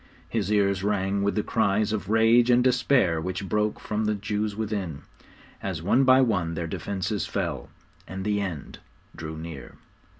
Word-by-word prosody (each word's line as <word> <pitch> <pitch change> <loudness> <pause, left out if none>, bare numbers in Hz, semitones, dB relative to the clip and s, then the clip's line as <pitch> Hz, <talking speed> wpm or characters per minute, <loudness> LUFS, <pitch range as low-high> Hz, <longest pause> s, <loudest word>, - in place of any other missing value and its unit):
His 105 -3 -2
ears 100 -2 +2
rang 100 -1 0
with 100 0 0
the 105 - 0
cries 110 -1 +1
of 100 -2 -3
rage 115 +2 +4
and 125 0 +5
despair 125 - +2
which 95 +3 -4
broke 105 +3 0
from 110 0 -2
the 105 0 +1
Jews 105 0 -2
within, 100 -9 -3 0.6
as 90 -5 -4
one 125 +9 +3
by 130 0 +6
one 90 -9 0
their 85 0 -3
defences 95 +3 -3
fell, - - -3 0.4
and 95 +2 -6
the 105 -1 +1
end 90 -7 -6 0.4
drew 80 0 -6
near! 80 +1 -8
100 Hz, 165 wpm, -26 LUFS, 95-110 Hz, 0.6 s, by